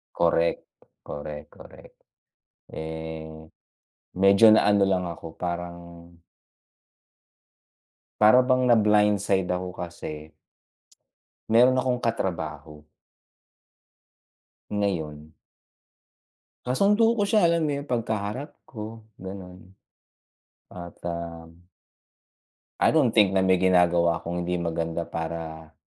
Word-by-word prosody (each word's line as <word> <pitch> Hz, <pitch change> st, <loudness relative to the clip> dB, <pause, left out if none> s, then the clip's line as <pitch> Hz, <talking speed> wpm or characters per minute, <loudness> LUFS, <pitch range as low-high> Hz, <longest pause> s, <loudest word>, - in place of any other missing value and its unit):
Correct, 85 Hz, 0 st, +1 dB, 0.4 s
correct, 75 Hz, 0 st, -7 dB
correct. -, -, -16 dB, 0.7 s
Eh, 80 Hz, 0 st, -7 dB, 0.9 s
medyo 100 Hz, +3 st, +6 dB
na-ano 105 Hz, -2 st, +4 dB
lang 95 Hz, -2 st, 0 dB
ako 80 Hz, -1 st, -9 dB
parang 85 Hz, 0 st, -4 dB, 2.4 s
Para 110 Hz, +4 st, +7 dB
bang 130 Hz, 0 st, +2 dB
na 120 Hz, -, +6 dB
blind 105 Hz, -2 st, +3 dB
side 95 Hz, -3 st, +1 dB
ako 90 Hz, 0 st, -3 dB
kasi 80 Hz, -3 st, -8 dB, 1.2 s
meron 125 Hz, +3 st, +5 dB
akong 125 Hz, -1 st, 0 dB
katrabaho 80 Hz, -, -4 dB, 1.8 s
ngayon. 80 Hz, -7 st, -3 dB, 1.3 s
Kasundo 200 Hz, -, +2 dB
ko 205 Hz, -, +2 dB
siya, 210 Hz, +1 st, +3 dB
alam 170 Hz, -1 st, +1 dB
mo 145 Hz, -, -1 dB
yun, 140 Hz, 0 st, -4 dB
'pag 115 Hz, -2 st, -1 dB
kaharap 110 Hz, +7 st, -4 dB, 0.2 s
ko, 110 Hz, -1 st, -8 dB, 0.2 s
ganun 95 Hz, -1 st, -10 dB, 1.0 s
at 85 Hz, -1 st, -10 dB
um 85 Hz, 0 st, -7 dB, 1.1 s
I -, -, +4 dB
don't 135 Hz, -8 st, +4 dB
think 100 Hz, -4 st, +3 dB
na 95 Hz, -, +3 dB
may 95 Hz, -1 st, +3 dB
ginagawa 85 Hz, -2 st, +3 dB
akong 85 Hz, +1 st, -4 dB
hindi 90 Hz, +1 st, -1 dB
maganda 85 Hz, -1 st, -2 dB
para 80 Hz, -1 st, -6 dB
90 Hz, 95 wpm, -25 LUFS, 85-110 Hz, 2.4 s, Para